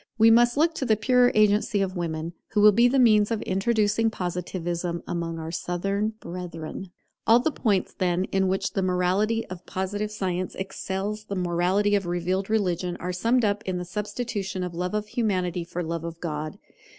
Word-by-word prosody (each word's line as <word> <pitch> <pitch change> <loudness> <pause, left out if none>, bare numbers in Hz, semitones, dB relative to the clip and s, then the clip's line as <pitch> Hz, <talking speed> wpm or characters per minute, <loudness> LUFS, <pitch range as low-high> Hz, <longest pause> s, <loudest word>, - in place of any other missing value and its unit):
We 225 0 +7
must 240 +2 +5
look 325 +2 +3
to 300 - -4
the 220 -3 +4
purer 245 +3 +4
agency 210 0 +3
of 195 -1 -1
women, 165 -1 -3 0.2
who 210 - +3
will 210 0 +8
be 235 +4 +5
the 265 +3 +2
means 215 -5 +5
of 225 -2 -2
introducing 215 +2 +1
Positivism 175 -2 -3
among 170 -1 -3
our 160 0 -5
Southern 195 +5 -1
brethren. 175 0 -7 0.4
All 230 +2 +7
the 310 +6 0
points, 205 -9 0
then, 180 0 0
in 190 0 +2
which 190 +1 -1
the 195 - 0
morality 190 +5 +1
of 180 -1 -9
Positive 205 +3 -2
science 185 -3 -3
excels 195 +2 -4
the 200 - -4
morality 180 +3 +1
of 200 -3 +1
revealed 180 +3 -1
religion 180 -5 0
are 180 +1 -3
summed 230 +6 +2
up 205 0 0
in 185 -1 -1
the 180 - -4
substitution 205 0 -3
of 180 -1 -4
Love 180 +3 -2
of 210 0 -1
Humanity 185 -6 -1
for 175 +1 -4
Love 165 0 -3
of 165 0 -6
God. 155 -2 -4
190 Hz, 185 wpm, -26 LUFS, 175-215 Hz, 0.4 s, will